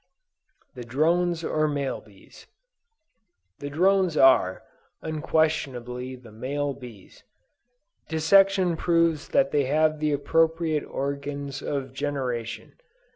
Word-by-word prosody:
THE 125 - -8
DRONES 165 +7 +1
OR 155 -1 0
MALE 145 -2 -2
BEES. 100 -3 -18 1.1
The 145 - -5
drones 185 +1 +2
are, 130 -8 +4 0.4
unquestionably, 135 -6 -1
the 125 -3 -15
male 140 +6 -3
bees. 120 -8 -13 0.9
Dissection 185 +2 +3
proves 165 -3 +1
that 135 0 +2
they 145 -2 +2
have 155 +2 +2
the 155 0 0
appropriate 160 +1 +1
organs 140 0 -4
of 135 -2 -4
generation. 130 -5 -4
145 Hz, 100 wpm, -25 LUFS, 130-160 Hz, 1.1 s, are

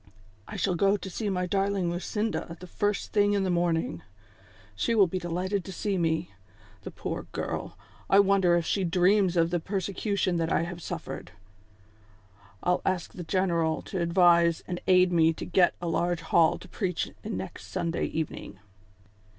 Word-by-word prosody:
" 95 - -29
I - - -8
shall 190 - 0
go 195 +4 +3
to 190 - -7
see 210 +3 -2
my 180 -2 -1
darling 195 -1 0
Lucinda 185 -1 -3
the 180 - -9
first 205 +3 -2
thing 205 -1 +3
in 200 -1 +1
the 185 - 0
morning; 170 - 0 0.7
she 230 - 0
will 205 -3 +6
be 185 +1 -3
delighted 180 +3 -2
to 190 - -8
see 200 +2 -2
me! 165 -1 0 0.5
The - - -7
poor - - -5
girl, - - -4 0.3
I 195 - +6
wonder 195 -3 +4
if 170 -1 0
she 195 - 0
dreams 185 +1 +3
of 165 0 +3
the 175 - +1
persecution 195 0 -1
that 165 -1 -1
I - - +2
have 175 0 -6
suffered? 90 - -6 1.3
I'll 180 0 +2
ask 185 -3 -1
the 180 - -7
general 170 -2 0
to 185 - -4
advise 170 -1 +4
and 175 -1 -4
aid 185 -1 +5
me 165 -1 +4
to - - -7
get 180 0 +3
a 175 - -4
large 175 +1 0
hall 165 0 +3
to - - -13
preach 180 -2 -2
in - - -4
next 95 0 -7
Sunday 170 +9 -2
evening 155 -9 -5
180 Hz, 175 wpm, -28 LUFS, 170-195 Hz, 1.3 s, will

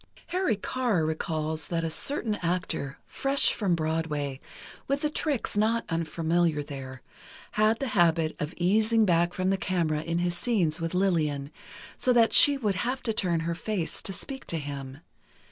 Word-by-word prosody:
Harry 360 - +1
Carr 210 -5 -1
recalls 155 -1 -2
that 165 -1 -2
a 165 - -1
certain 230 - 0
actor, 170 -5 -2
fresh 275 +1 +1
from 190 -5 0
Broadway, 155 -4 -2 0.5
with 275 +1 0
the 300 - 0
tricks 290 -8 -1
not 220 +3 +1
unfamiliar 165 -1 0
there, 130 -3 -8 0.5
had 215 +1 +2
the 270 0 -3
habit 165 -5 +2
of 150 +1 -3
easing 215 +5 +3
back 175 -2 +2
from 185 +1 0
the 195 - +1
camera 170 -5 -1
in 170 +1 -2
his 175 0 0
scenes 175 -7 0
with 165 +2 -3
Lillian, 155 -7 0 0.5
so 255 - +2
that 230 -2 +4
she 285 -1 +9
would 215 -7 0
have 255 +2 -2
to 225 - -1
turn 175 -6 0
her 170 +1 -2
face 180 0 -3
to - - -5
speak 265 +7 -6
to 165 - -2
him. 140 -1 -7
175 Hz, 165 wpm, -27 LUFS, 160-220 Hz, 0.5 s, she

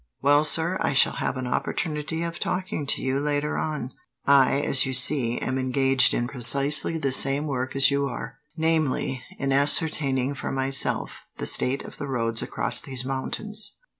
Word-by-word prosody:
"Well, 145 +2 +3
sir, 165 +4 +2
I - - 0
shall 135 - +3
have - - -2
an 130 - -4
opportunity 155 +5 -3
of 170 0 -5
talking 180 -6 -3
to - - -2
you, 130 +1 -1
later 145 +1 -2
on. 150 -5 -4 0.3
I, 140 0 +4
as 140 -2 +2
you 135 - -3
see, 125 -2 +2
am 130 0 -2
engaged 130 0 +3
in 120 - -1
precisely 140 +5 +2
the 140 -4 -1
same 135 +3 +4
work 130 -3 -4
as 135 +1 +6
you 140 0 0
are; 140 - -8 0.2
namely, 155 -5 -1
in 140 -1 -2
ascertaining, 140 -2 +1
for 140 - -6
myself, 135 0 0 0.3
the - - -4
state 135 +2 +2
of - - -12
the 145 - -5
roads 115 -4 0
across - - 0
these 130 -2 -5
mountains." 205 +11 -4
140 Hz, 170 wpm, -24 LUFS, 130-150 Hz, 0.3 s, as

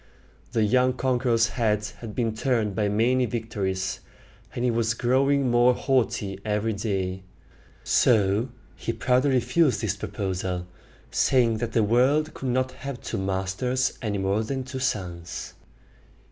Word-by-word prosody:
The 110 - +2
young 125 +4 +3
conqueror's 120 -3 +1
head 105 -4 0
had 110 -3 -8
been 115 -3 0
turned 110 -3 0
by 105 +2 0
his 100 - 0
many 125 +4 +2
victories, 100 -5 -2 0.6
and 120 - -1
he 125 - +3
was 115 0 0
growing 135 +2 +2
more 120 +1 +5
haughty 115 -8 0
every 110 +1 0
day: 95 -2 -2 0.6
so 105 +2 +3 0.3
he 115 - -3
proudly 125 +4 +2
refused 130 -1 +2
this 105 -4 -1
proposal, 95 -3 -3 0.5
saying 115 -4 +3
that 120 -1 -3
the 115 - +3
world 135 +8 +2
could 130 - -4
not 130 +1 0
have 140 -3 -7
two - - -4
masters 95 +7 -1
any 105 -4 -2
more 100 +3 0
than 130 +4 -3
two 130 +1 -6
suns. 90 -9 -3
115 Hz, 145 wpm, -25 LUFS, 100-130 Hz, 0.6 s, more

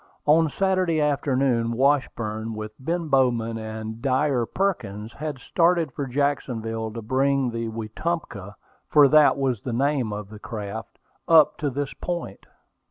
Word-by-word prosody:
On 160 +1 +4
Saturday 185 -1 +1
afternoon, 135 -5 +1
Washburn, 115 -5 0
with 110 0 -6
Ben 165 +4 -2
Bowman 120 -5 +1
and 110 +1 -6
Dyer 130 -2 +1
Perkins, 115 - -2
had 150 -1 -5
started 170 +2 +1
for 140 +2 -4
Jacksonville 120 -5 -2
to 115 -1 -6
bring 135 +2 +1
the 115 0 -3
Wetumpka, 110 - -4 0.3
for 145 -2 +7
that 150 +1 +5
was 130 -6 -1
the 125 - -4
name 135 -2 0
of 105 -1 -6
the 105 - -10
craft, 110 0 -7 0.3
up 160 -2 +6
to 145 - 0
this 140 +1 -3
point. 170 - -5
130 Hz, 140 wpm, -24 LUFS, 110-150 Hz, 0.3 s, for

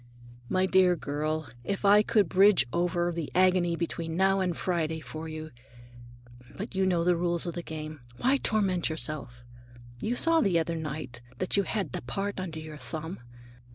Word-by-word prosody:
"My 185 0 +2
dear 185 -1 +4
girl, 155 0 -2 0.2
if 200 - -3
I 205 +1 +7
could 210 -2 +2
bridge 195 -5 +5
over 175 0 +1
the 165 -3 -4
agony 180 -2 +3
between 165 -1 -3
now 195 +1 +3
and 180 -3 -1
Friday 160 -3 -1
for 155 +1 -7
you—But 120 - -11
you 190 0 +1
know 175 -2 +2
the 175 0 +3
rules 170 0 0
of 170 - -3
the 175 - -4
game; 155 -2 -7 0.2
why 270 +3 +3
torment 195 -9 +1
yourself? 155 -6 -3 0.6
You 230 - -1
saw 330 +4 +4
the 190 - +2
other 165 0 0
night 150 -6 -5 0.2
that 185 - 0
you 200 - +4
had 195 - -2
the - - -4
part 195 +12 -3
under 175 -4 -5
your 155 -1 -8
thumb. 160 +6 -6
170 Hz, 170 wpm, -28 LUFS, 155-185 Hz, 0.6 s, I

